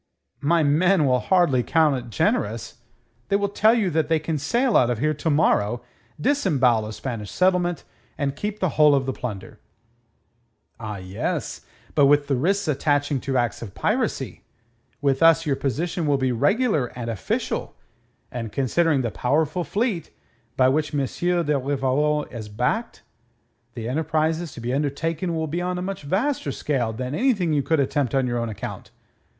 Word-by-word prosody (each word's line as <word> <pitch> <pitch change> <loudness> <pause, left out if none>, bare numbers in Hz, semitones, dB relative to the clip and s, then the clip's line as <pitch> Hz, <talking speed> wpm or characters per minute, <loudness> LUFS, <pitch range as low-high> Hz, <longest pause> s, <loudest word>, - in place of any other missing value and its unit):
"My 165 +3 +3
men 160 +3 +3
will 125 -2 +3
hardly 175 -5 +3
account 155 +3 +3
it 120 -2 -6
generous. 110 +1 -1 0.5
They 200 - +2
will 200 0 +1
tell 215 +3 +4
you 205 -6 +1
that 160 -1 +1
they 160 0 +3
can 155 0 -3
sail 235 - +1
out 125 - +5
of 120 - 0
here 155 +6 +1
to 155 +2 -2
morrow, 120 -6 +2 0.4
disembowel 135 - +2
a 110 - -6
Spanish 110 -4 -5
settlement, 180 -2 +1 0.3
and 140 -1 -1
keep 205 +6 -4
the 185 - +1
whole 150 -1 +5
of 135 -1 0
the 130 - -2
plunder." 110 -7 -7 1.2
"Ah, 105 -2 -5
yes, 95 +1 -4 0.3
but 145 -2 +5
with 145 0 +4
the 140 - 0
risks 195 +8 0
attaching 145 -1 +1
to 135 +1 -1
acts 120 -3 -1
of 105 -5 -8
piracy. - - -1 0.6
With 135 -2 +1
us 165 0 +5
your 145 -3 +1
position 160 +6 -2
will 145 -1 +3
be 130 -1 0
regular 195 - +2
and 120 -2 -4
official, 115 -5 -3 0.6
and 115 -3 -5
considering 140 +3 +1
the 115 -3 -2
powerful 155 - 0
fleet 205 -2 -1 0.5
by 130 - +5
which 150 +3 0
M. 140 -1 +1
de 170 -1 0
Rivarol 145 +2 0
is 110 -4 -7
backed, 125 - -2 0.7
the 115 -2 -5
enterprises 160 +3 0
to - - -9
be 120 +2 -2
undertaken 160 +5 -1
will 160 0 -1
be 165 +3 -3
on 180 0 -2
a - - -3
much 195 0 -4
vaster 190 - -1
scale 130 -5 -1
than 125 +4 -5
anything 195 - +1
you 145 - +2
could 160 +2 +1
attempt 140 -1 0
on 135 -1 +2
your 120 -1 -1
own 115 -1 -2
account. 105 - -7
145 Hz, 170 wpm, -23 LUFS, 125-170 Hz, 1.2 s, out